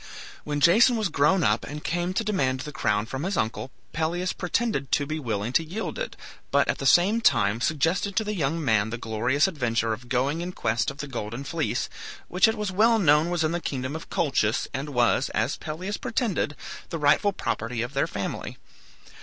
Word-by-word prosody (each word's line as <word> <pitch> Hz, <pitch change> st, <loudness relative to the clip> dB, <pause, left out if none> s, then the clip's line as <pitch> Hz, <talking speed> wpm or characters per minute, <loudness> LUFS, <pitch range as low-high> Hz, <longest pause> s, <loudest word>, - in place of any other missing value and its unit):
When 145 Hz, -1 st, -3 dB
Jason 225 Hz, -, +6 dB
was 215 Hz, -4 st, 0 dB
grown 170 Hz, +6 st, +3 dB
up 105 Hz, 0 st, +2 dB
and 150 Hz, +1 st, -7 dB
came 175 Hz, +2 st, -1 dB
to 225 Hz, -, +1 dB
demand 135 Hz, -12 st, 0 dB
the 150 Hz, -, -6 dB
crown 105 Hz, -6 st, 0 dB
from 135 Hz, +4 st, -5 dB
his 190 Hz, +3 st, -2 dB
uncle, 110 Hz, +4 st, -2 dB, 0.2 s
Pelias 170 Hz, +3 st, -1 dB
pretended 180 Hz, -, -1 dB
to 145 Hz, -, +2 dB
be 155 Hz, +2 st, -3 dB
willing 115 Hz, -3 st, -3 dB
to 165 Hz, -, +3 dB
yield 190 Hz, -, -5 dB
it, -, -, -4 dB, 0.3 s
but -, -, +3 dB
at -, -, -1 dB
the -, -, 0 dB
same 205 Hz, +6 st, +5 dB
time 115 Hz, -, +3 dB
suggested 165 Hz, +8 st, 0 dB
to 220 Hz, -, +2 dB
the 210 Hz, 0 st, -3 dB
young 160 Hz, -2 st, -1 dB
man 110 Hz, -3 st, +2 dB
the 115 Hz, -, -4 dB
glorious 120 Hz, -, +1 dB
adventure 120 Hz, -9 st, 0 dB
of 120 Hz, +3 st, -9 dB
going 135 Hz, +6 st, 0 dB
in 180 Hz, +1 st, -4 dB
quest 110 Hz, -5 st, 0 dB
of 135 Hz, -, -8 dB
the 145 Hz, -, -5 dB
Golden 120 Hz, 0 st, -5 dB
Fleece, 160 Hz, +1 st, -2 dB, 0.4 s
which 180 Hz, +6 st, +4 dB
it 220 Hz, -, +1 dB
was 210 Hz, -2 st, -2 dB
well 225 Hz, +4 st, +4 dB
known 155 Hz, -4 st, +4 dB
was 175 Hz, -2 st, 0 dB
in 155 Hz, -, +1 dB
the 175 Hz, 0 st, -2 dB
kingdom 130 Hz, 0 st, -3 dB
of 160 Hz, -, -7 dB
Colchis, 125 Hz, -8 st, +1 dB
and 140 Hz, +2 st, -3 dB
was, 125 Hz, 0 st, +2 dB
as 110 Hz, +5 st, 0 dB
Pelias 180 Hz, +7 st, -5 dB
pretended, 210 Hz, -, -1 dB, 0.3 s
the 165 Hz, -, -3 dB
rightful 150 Hz, +7 st, +3 dB
property 115 Hz, -, -3 dB
of 120 Hz, +3 st, -6 dB
their 140 Hz, -, +1 dB
family. 100 Hz, -1 st, -5 dB
150 Hz, 205 wpm, -26 LUFS, 125-180 Hz, 0.4 s, Jason